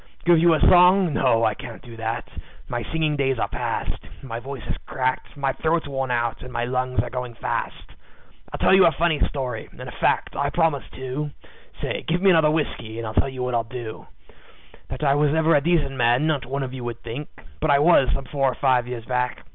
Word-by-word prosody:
Give 170 -1 +6
you 170 0 +5
a - - 0
song? 180 -1 +6
No, 115 -5 +2
I 110 - +3
can't 115 +2 -10
do 120 -2 -11
that; 115 +1 -3 0.4
my 120 -1 -3
singing 155 -2 0
days 135 -2 +1
are - - 0
past; - - -3 0.2
My 115 -3 -5
voice 130 -1 -8
is - - -2
cracked, 130 +2 -2
my 135 -1 0
throat's 160 -1 0
worn 135 -2 -3
out, 120 -2 -1
and 130 - -9
my 120 0 -1
lungs 125 +1 0
are - - -7
going 125 -2 -5
fast. - - -4 0.6
"I'll - - -4
tell - - +3
you 190 -2 +7
a - - +4
funny 160 0 +1
story, 125 -5 -4
and - - -18
a - - -7
fact, - - 0
I 140 0 0
promise, 160 -4 +1
too. 130 +3 -4 0.5
Say! - - -2
Give 170 +2 +1
me 195 +1 +5
another 160 -3 +5
whiskey, 145 -8 -2
and 115 - -4
I'll 110 - -5
tell 135 - +2
what 125 0 -2
I'll 115 -1 +1
do 115 -1 -8 0.8
That 130 +3 -6
I 140 -2 +4
was 145 +1 +2
ever 160 +1 +3
a 145 - +4
decent 160 -3 +1
man 120 +3 +3
not 145 -6 0
one 140 +1 -2
of 130 -1 -6
you 130 -2 -6
would 120 -1 -6
think; 120 +6 -6 0.3
But 155 - 0
I 140 - +6
was, 145 -3 +5
some 135 - -3
four 135 -1 0
or - - -8
five 125 -3 +2
years 120 -2 -6
back. 125 0 -2
135 Hz, 225 wpm, -23 LUFS, 120-155 Hz, 0.8 s, you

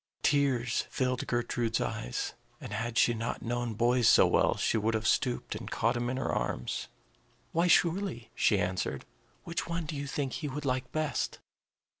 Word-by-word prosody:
Tears 135 -5 +2
filled 125 -1 -1
Gertrude's 120 -1 0
eyes; - - -3 0.3
and - - -7
had 115 +2 -2
she 120 - +5
not 115 +1 -3
known 120 -1 -2
boys 120 +2 +3
so - - +7
well, - - +3
she - - +1
would 110 +1 +1
have 110 0 0
stooped 125 -3 +1
and 105 0 -6
caught 115 +2 +1
him 120 0 -1
in 130 - -2
her 135 - -1
arms. 60 - -2 0.6
"Why, 170 +2 +2
surely," 175 - +2
she - - +3
answered. 90 0 -2 0.4
"Which 170 - -3
one 170 -1 -2
do 150 - -5
you 140 0 -4
think 140 -1 -2
he 150 - -3
would 145 +1 -5
like 130 -1 -1
best?" 155 -1 -1
120 Hz, 175 wpm, -30 LUFS, 115-145 Hz, 0.6 s, so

